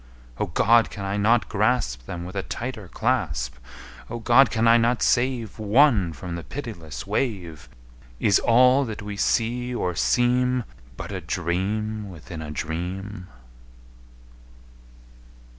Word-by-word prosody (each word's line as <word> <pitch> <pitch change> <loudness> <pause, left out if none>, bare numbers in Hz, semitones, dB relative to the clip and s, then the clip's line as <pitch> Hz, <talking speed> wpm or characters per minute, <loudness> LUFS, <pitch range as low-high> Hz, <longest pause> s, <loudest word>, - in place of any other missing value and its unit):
O - - 0
God! 115 +1 +4
can 100 - -6
I 95 +1 -2
not 105 0 +3
grasp 105 - 0
Them 85 0 -5
with 90 +2 -9
a 95 - 0
tighter 115 -2 -6
clasp? - - -1 0.5
O 120 - -4
God! 120 +3 +5
can 115 -1 +1
I 115 - +7
not 120 +1 +1
save 120 -3 0
One 110 - +4
from 85 +3 -7
the 85 0 -5
pitiless 85 - -7
wave? 90 - -3 0.5
Is 100 -3 +4
all 125 +3 +5
that 110 -2 -6
we 105 0 -5
see 120 +4 0
or 90 -6 -1
seem 125 +6 +2 0.3
But - - -6
a - - -4
dream 100 +6 -2
within 85 -1 -9
a 75 - -6
dream? 90 +5 -5
105 Hz, 135 wpm, -24 LUFS, 90-120 Hz, 0.5 s, I